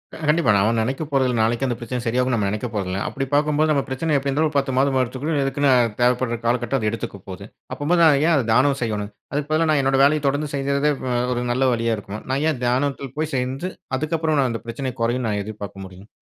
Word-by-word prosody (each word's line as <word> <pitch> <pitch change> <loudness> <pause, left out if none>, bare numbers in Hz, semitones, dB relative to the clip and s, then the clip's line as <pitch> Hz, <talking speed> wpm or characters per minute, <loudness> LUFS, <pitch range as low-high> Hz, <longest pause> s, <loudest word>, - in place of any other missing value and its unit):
அ - - -8
கண்டிப்பா. 150 -6 +3
நாம 105 +4 +2
நினைக்க 130 +7 -2
போறதில்லை. 130 -3 +1
நாளைக்கு 115 +4 +1
அந்த 120 - -1
பிரச்சனை 125 0 -4
சரியாகும்னு 125 +2 +1
நம்ம 100 -3 0
நினைக்க 105 +4 -3
போறதில்லை. 95 -2 -2
அப்படி 135 - -3
பார்க்கும்போது 150 +1 +2
நம்ம 140 -2 +2
பிரச்சனை 150 +4 -2
எப்படி 140 0 -2
இருந்தாலும் 155 +3 +1
ஒரு 145 - -1
10 135 -2 0
மாதமாவது 135 -1 +3
எடுத்துக்குடும், 140 +5 -2
அதுக்குன்னு 140 +1 +1 0.3
தேவைப்படுற 125 -1 +2
காலகட்டம் 120 +2 +1
அது 110 -2 0
எடுத்துக்க 105 -3 -5
போகுது. 95 +1 -8 0.3
அப்பம்போது 170 +4 +1
நான் 150 -4 +6
ஏன் 170 - +4
அதை 135 -5 +1
தியானம் 135 +4 +3
செய்யணும். 105 -3 -2 0.2
அதற்கு 145 +1 -2
பதிலா, 160 +1 +2
நான் 150 -2 +3
என்னோட 135 0 +2
வேலைய 150 +2 +4
தொடர்ந்து 145 +1 -1
செய்யறதே 140 +1 +1
வ 125 -1 -1 0.2
ஒரு 120 - -2
நல்ல 130 +2 +1
வழியா 115 -1 0
இருக்குமா? 105 +1 -7
நான் 135 +3 0
ஏன் 130 -5 -6
தியானத்தில 135 +2 0
போய் 155 0 -2
செஞ்சு, 130 +7 -2 0.3
அதுக்கப்புறம் 155 +1 0
நான் 130 -2 +2
அந்த 115 - -4
பிரச்சனை 130 +2 -4
குறையும்னு, 120 +1 0
நான் 105 -1 -1
எதிர்பார்க்க 100 -2 -8
முடியும்? 95 +2 -13
130 Hz, 220 wpm, -22 LUFS, 115-145 Hz, 0.3 s, நான்